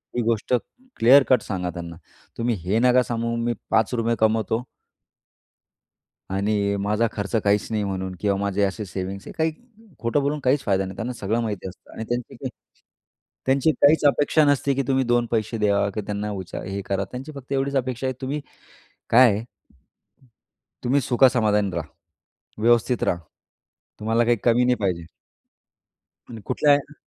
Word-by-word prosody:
ही 120 - +1
गोष्ट 115 +1 0 0.4
clear 130 +5 +7
cut 125 -3 +5
सांगा 90 -3 -3
त्यांना. 85 0 -7 0.4
तुम्ही 115 0 0
हे 100 +5 +2
नका 125 +1 +4
सांगू, 115 -1 -2
मी 120 0 0 0.2
5 110 0 +2
रुपये 115 0 +1
कमावतो 110 +1 +1 1.7
आणि 100 +1 0
माझा 105 +3 +1
खर्च 105 +1 -4
काहीच 100 0 +2
नाही 110 -2 0
म्हणून 95 -1 -3
किंवा 100 -2 +1
माझे 100 0 -1
असे 100 +2 -1
सेव्हिंग्स 95 +1 -6
आहे. - - -8
काही 160 0 +1 0.5
खोटं 115 +5 0
बोलून 145 +2 -1
काहीच 135 +2 +3
फायदा 95 -2 +1
नाही, 95 0 -7
त्यांना 120 +2 -3
सगळं 115 0 -1
माहिती 105 -4 -4
असतं. 95 - -15
आणि 110 - -6
त्यांची 120 0 -3
काही - - -5 1.0
त्यांची 135 +3 +3
काहीच 150 +2 +5
अपेक्षा 145 +2 +3
नसते 140 -1 +2
की 140 - 0
तुम्ही 135 -1 +2
2 120 0 +2
पैसे 110 0 -1
द्यावा 100 -1 +2
किंवा 105 +1 -5
त्यांना 105 0 -3 0.4
हे 100 +1 -3
करा. 100 0 -1
त्यांची 130 +9 -8
फक्त 135 0 -8
एवढीच 140 +1 0
अपेक्षा 130 0 -1
आहे, 130 - -1
तुम्ही 140 +3 -3 0.7
काय 125 +1 +7
आहे 105 +3 -3 1.4
तुम्ही 135 +3 +3
सुख 125 0 +2
समाधानी 105 -5 +2
राहा. 80 -2 -3 0.8
व्यवस्थित 120 +1 +3
राहा. 85 - 0 0.8
तुम्हाला 115 +2 +1
काही 120 0 +3
कमी 120 +1 +4
नाही 125 0 +3
पाहिजे. 90 -4 -1 1.3
आणि 115 -2 -8
कुठल्या 145 - +3
या 145 +1 -3
115 Hz, 160 wpm, -23 LUFS, 100-125 Hz, 1.7 s, clear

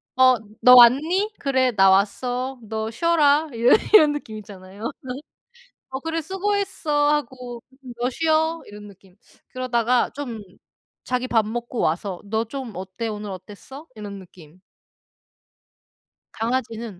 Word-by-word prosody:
"어 255 0 +6 0.3
너 250 0 +8
왔니?" 310 - +5
"그래, 260 -2 +1
나 195 -4 +4
왔어." 245 +7 0
"너 220 0 -4
쉬어라." 305 +2 +2
이러 235 +1 +3 0.2
이런 305 -8 +7
느낌 220 -7 -7
있잖아요. 200 +2 -8 1.0
"어 265 0 -5
그래. 325 +1 -3
수고했어." 380 -5 0
하고 250 -4 -5 0.4
"너 245 +1 0
쉬어." 320 +3 +1
이런 205 0 -11
느낌. 190 -2 -19 0.4
그러다가 250 -1 0
좀 245 -7 -7 0.6
자기 250 0 -2
밥 225 -3 +2
먹고 240 +2 -5
와서 180 +2 -1
"너 220 +2 -1
좀 255 0 -7
어때? 190 +5 -6
오늘 210 -1 -5
어땠어?" 210 - -11
이런 205 -2 -8
느낌. 175 -2 -16 1.7
강아지는 225 -4 -3
245 Hz, 240 characters per minute, -22 LUFS, 210-285 Hz, 1.7 s, 너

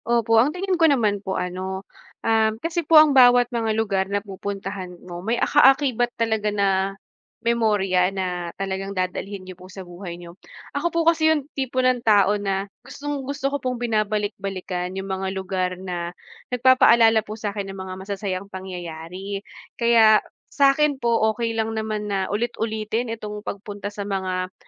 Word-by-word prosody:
Opo 230 -1 +3
ang 260 - +3
tingin 365 +1 -2
ko 325 - +7
naman 215 -8 +1
po 190 -1 -3
ano, 190 +2 -4 0.4
um, 220 -1 +3
kasi 330 +7 -2
po 320 0 +5
ang 305 -2 +7
bawat 245 -1 +6
mga 225 -2 0
lugar 195 -4 +1
na 200 - 0
pupuntahan 195 -2 -6
mo 175 -1 -7
may 225 +5 -1
ka 295 - +3
akibat 265 -3 +4
talaga 220 -2 0
na, 200 -1 +1 0.7
memorya 210 -6 +2
na 180 -2 -3
talagang 195 0 -4
dadalhin 185 +2 -3
niyo 185 -1 -10
po 185 - -13
sa 190 +1 -10
buhay 175 0 -8
niyo. 175 0 -12 0.4
Ako 340 +4 -1
po 335 -1 +1
kasi 320 -1 +3
yung 295 -2 -3
tipo 260 -1 0
ng 255 -1 +2
tao 205 -1 +4
na 195 0 -2 0.2
gustong-gusto 280 -1 -4
ko 285 - -1
pong 255 -3 -4
binabalik-balikan 200 -5 -2
yung 190 0 -5
mga 190 0 -2
lugar 190 -1 -2
na 175 -2 -4 0.4
nag-papaalala 235 -3 +5
po 215 - -6
sa 215 -1 -4
akin 200 -1 -4
ng - - -10
mga 190 0 -6
masasayang 195 -1 -4
pangyayari. 185 0 -7 0.3
Kaya, 225 -2 +5 0.3
sa'kin 280 0 +3
po, 235 -1 +2 0.2
okey 230 0 -2
lang 225 0 -1
naman 215 -2 -3
na 190 -1 -1
ulit-ulitin 220 +1 -2
itong 210 -2 -6
pagpunta 205 0 -6
sa 205 -1 -6
mga 185 -2 -2
210 Hz, 165 wpm, -23 LUFS, 190-235 Hz, 0.7 s, ko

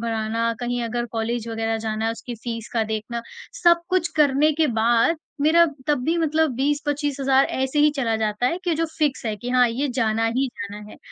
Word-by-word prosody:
भराना, 230 0 -1
कहीं 245 0 -2
अगर 240 +1 -2
कॉलेज 230 0 -2
वग़ैरह 225 0 -1
जाना 215 0 -2
है - - +1
उसकी 240 +1 -7
फीस 230 -1 -5
का 230 - +1
देखना, 220 +2 -4 0.4
सब-कुछ 345 +1 +3
करने 300 +1 +4
के 315 - +5
बाद 235 +8 +3 0.2
मेरा 325 +3 +5 0.2
तब 295 -2 +2
भी 330 +4 +1
मतलब 320 -1 +2
20-25,000 285 -1 +1
ऐसे 265 +2 -2
ही 300 +1 +5
चला 235 -5 0
जाता 215 +2 0
है 335 +7 0
कि 345 -2 +1
जो 330 +1 0
फिक्स 295 -6 0
है 215 - -1
कि 240 +4 -6
हाँ 250 -1 +4
ये 260 +5 -2
जाना 225 -2 +1
ही 270 +1 +2
जाना 210 -1 -7
है - - -12
245 Hz, 195 wpm, -23 LUFS, 225-295 Hz, 0.4 s, के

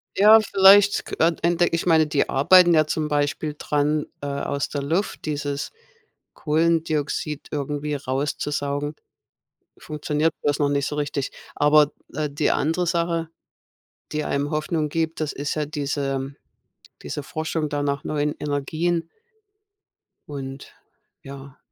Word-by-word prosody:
Ja, 215 +3 +8
vielleicht 200 0 +5
k - - -6 0.3
entdecke 170 0 +2
ich 170 - -3
meine, 160 -2 +5
die 150 -1 0
arbeiten 175 +5 +6
ja 155 -1 +4
zum 155 0 -2
Beispiel 150 +1 -1
dran, 150 +1 0 0.2
äh, 145 - -4
aus 140 0 -2
der 145 -2 -3
Luft, 170 +8 -2
dieses 145 -1 -3 0.6
Kohlendioxid 155 -2 0
irgendwie 145 +1 -3
rauszusaugen, 145 +2 -2 0.8
funktioniert 150 +1 -1
bloß 145 0 +1
noch 145 - +3
nicht 140 -1 0
so 150 - -3
richtig. 145 -2 -2 0.2
Aber, 150 0 +4 0.2
d - - -12
äh, 150 - -3
die 145 +2 0
andere 165 +4 0
Sache 170 -1 0 0.8
die 150 0 -2
einem 140 0 -1
Hoffnung 155 0 -1
gibt, 160 +1 -2
das 155 -2 -2
ist 145 +2 -3
ja 150 - -1
diese 145 -1 -2
ähm, 135 +1 -5 0.7
diese 145 - -5
Forschung 155 -1 -3
da 145 0 -2
nach 140 -1 -1
neuen 150 0 -1
Energien 160 +4 -1 1.2
und, 135 -2 -7 0.5
ja. 140 0 -11
150 Hz, 135 wpm, -23 LUFS, 145-160 Hz, 1.2 s, Ja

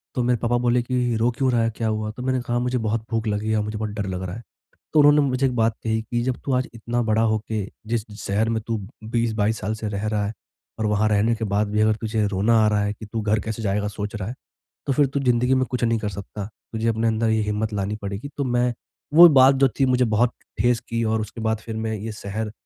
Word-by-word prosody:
तो 125 - +1
मेरे 120 0 +2
पापा 120 0 +1
बोले 120 0 +3
कि 125 -2 0
रो 115 +2 +3
क्यों 130 -2 +2
रहा 120 -1 +2
है, 115 - +2
क्या 115 - -1
हुआ? 110 0 -1
तो 125 +3 -8
मैंने 130 -1 0
कहा 120 0 -2
मुझे 125 +1 0
बहुत 110 0 -1
भूख 115 -1 -1
लगी 105 +1 -1
है 110 - +2
और 105 - +1
मुझे 105 +1 -4
बहुत 110 0 -2
डर 105 -1 -3
लग 95 0 -4
रहा 90 0 -5
है, 115 - -9 0.5
तो 155 - +5
उन्होंने 145 0 +6
मुझे 130 +1 +1
एक 125 - -3
बात 115 -1 +2
कही 110 0 0
कि 120 +2 -2
जब 130 -1 0
तू 135 - 0
आज 125 0 +1
इतना 120 +1 -2
बड़ा 110 0 +2
होके 110 -2 -2 0.2
जिस 115 -1 -1 0.2
शहर 105 +3 0
में 110 -1 -1
तू 115 -1 0 0.3
20-22 110 -1 0
साल 105 - -1
से 110 0 -5
रह 100 +1 -3
रहा 105 -1 0
है 105 - -3 0.5
और 110 - 0
वहाँ 105 +1 +2
रहने 110 +3 +2
के 110 0 -3
बाद 100 +1 +1
भी 105 0 +1
अगर 110 0 +3
तुझे 110 -1 0
रोना 105 +4 +2
आ - - +4
रहा 105 -1 +2
है, 105 0 -1
कि 110 - -10
तू 110 +1 -4
घर 105 +1 +1
कैसे 110 +1 -4
जाएगा 105 0 0
सोच 105 +1 -5
रहा 100 -2 -4
है, 125 - -6 0.5
तो 135 - +1
फिर 145 +1 +3
तू 140 +2 -2
ज़िंदगी 125 0 +2
में 130 0 +2
कुछ 125 -1 -3
नहीं 115 -1 +2
कर 105 - -2
सकता, 100 +1 -7 0.3
तुझे 110 +1 -1
अपने 115 +1 +1
अंदर 110 0 +1
ये 110 0 +2
हिम्मत 105 +1 -2
लानी 100 +1 -2
पड़ेगी। 100 +7 -5
तो 140 - 0
मैं 120 -1 +1 0.4
वो 175 +1 +11
बात 135 -2 +6
जो 135 0 +4
थी 135 - +5
मुझे 125 -1 +3
बहुत 115 +2 +2 0.3
ठेस 120 -1 +3
की 115 0 -1
और 110 0 +1
उसके 110 +2 -7
बाद 110 0 +1
फिर 115 0 -7
मैं 110 0 -2
ये 110 +2 -5
शहर 105 +1 -5
110 Hz, 270 wpm, -23 LUFS, 105-120 Hz, 0.5 s, वो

